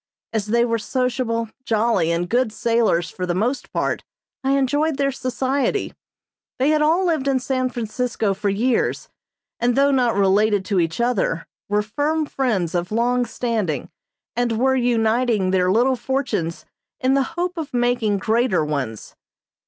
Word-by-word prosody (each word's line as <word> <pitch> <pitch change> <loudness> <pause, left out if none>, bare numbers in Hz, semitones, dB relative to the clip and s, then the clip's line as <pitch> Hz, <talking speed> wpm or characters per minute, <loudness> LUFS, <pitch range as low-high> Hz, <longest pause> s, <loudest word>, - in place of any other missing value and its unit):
As 215 -2 -1
they 235 +2 +3
were 230 -1 0
sociable, 240 -1 -1
jolly, 225 -7 +1
and 170 +1 0
good 240 +2 +1
sailors 225 -6 +1
for 180 -1 -4
the 175 - 0
most 240 +8 -1
part, - - -1 0.4
I 270 +1 +2
enjoyed 290 +3 +1
their 275 -1 +1
society. 265 - -1 0.6
They 265 +3 +2
had 305 0 +3
all 330 +5 +3
lived 315 -6 0
in 270 -1 +2
San 255 0 -1
Francisco 230 -3 -2
for 200 +1 -2
years, 230 +5 0 0.5
and 240 0 +2
though 280 +1 +4
not 250 -4 +2
related 200 0 +3
to 195 -1 +1
each 165 +2 -1
other, 235 -8 0 0.2
were 210 0 +2
firm 295 +8 -1
friends 215 - -1
of 175 +1 -2
long 245 +2 +1
standing 215 - -2 0.4
and 235 -1 0
were 265 +3 +3
uniting 230 -4 +2
their 185 -1 +2
little 245 +5 +3
fortunes 250 - -2 0.3
in 260 +1 +2
the 275 - +3 0.2
hope 360 +1 -1
of 320 -4 -5
making 240 -4 +1
greater 220 -4 +1
ones. 135 -8 -4
235 Hz, 155 wpm, -21 LUFS, 205-260 Hz, 0.6 s, though